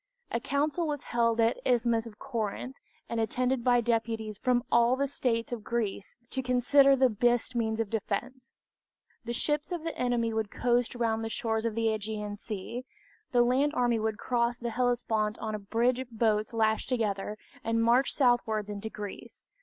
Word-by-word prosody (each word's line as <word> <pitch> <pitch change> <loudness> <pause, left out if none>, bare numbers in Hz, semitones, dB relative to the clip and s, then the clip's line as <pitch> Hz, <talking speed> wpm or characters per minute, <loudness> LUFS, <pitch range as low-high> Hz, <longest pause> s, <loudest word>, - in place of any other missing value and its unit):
A 235 - 0
council 295 +7 0
was 290 -2 -3
held 230 -1 +1
at 230 +1 +3
the - - 0
Isthmus 235 -1 +1
of 210 -2 -12
Corinth, 240 0 -4 0.3
and 230 - -2
attended 250 +2 0
by 245 -1 +4
deputies 225 -2 -1
from 250 -2 +2
all 235 +1 +5
the 280 +1 0
states 245 -4 -1
of 235 -3 -4
Greece 215 -4 -3 0.2
to 265 - -1
consider 260 +2 +5
of 270 - +1
the 260 - +7
best 240 +2 +1
means 220 -1 0
of 225 -3 -1
defense. 240 +4 -3 0.7
The 235 - -3
ships 295 +6 -1
of 345 -3 -3
the 330 - -3
enemy 240 -2 0
would 220 -2 -1
coast 245 +1 +1
round 225 -2 0
the 225 - -3
shores 225 0 -1
of 225 -2 -1
the 230 0 0
Ćgean 215 -1 -2
Sea, 215 +4 -6 0.5
the 245 -1 +5
land 270 +5 +2
army 240 -2 +2
would 220 -1 -1
cross 240 +1 0
the 235 -1 -4
Hellespont 225 -3 0
on 220 -1 -4
a 215 - -3
bridge 235 +5 +1
of 260 -1 -6
boats 220 -2 +1
lashed 220 0 +1
together, 210 -4 -1 0.3
and 230 0 +1
march 240 +4 +4
southwards 225 -5 +1
into 205 +2 -5
Greece. 205 -2 -8
235 Hz, 185 wpm, -29 LUFS, 220-250 Hz, 0.7 s, the